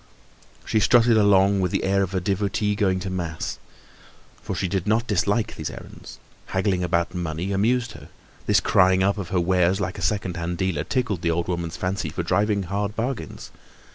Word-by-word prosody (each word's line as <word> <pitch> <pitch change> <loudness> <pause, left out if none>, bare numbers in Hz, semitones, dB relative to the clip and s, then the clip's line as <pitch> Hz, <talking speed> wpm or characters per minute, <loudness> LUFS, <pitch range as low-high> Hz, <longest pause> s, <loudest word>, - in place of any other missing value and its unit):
She 110 - +1
strutted 115 +2 +5
along 100 -2 +4
with 90 -1 +1
the - - -1
air 100 +1 +2
of 95 0 -2
a - - +2
devotee 100 +3 0
going 95 -2 +1
to 95 +1 -4
mass; 85 -4 -4 0.8
for - - -4
she 95 - -1
did 95 0 -2
not 110 +2 +2
dislike 105 +1 0
these - - -4
errands; - - -11 0.3
haggling 95 -1 0
about 85 0 0
money 85 +1 -3
amused 120 +4 +1
her; - - -12 0.4
this - - +5
crying 95 0 +4
up 100 +2 +1
of 90 -4 -5
her 95 -1 +1
wares 90 +1 +2
like 90 -2 -3
a - - -7
second 95 -4 -1
hand 85 +1 -3
dealer 90 -5 -1
tickled 125 -9 -1
the 85 - 0
old 85 +1 0
woman's 85 -2 -3
fancy 90 -3 -2
for 85 +3 -4
driving 100 +3 +1
hard 100 +3 -3
bargains. 120 0 -4
95 Hz, 190 wpm, -24 LUFS, 90-105 Hz, 0.8 s, strutted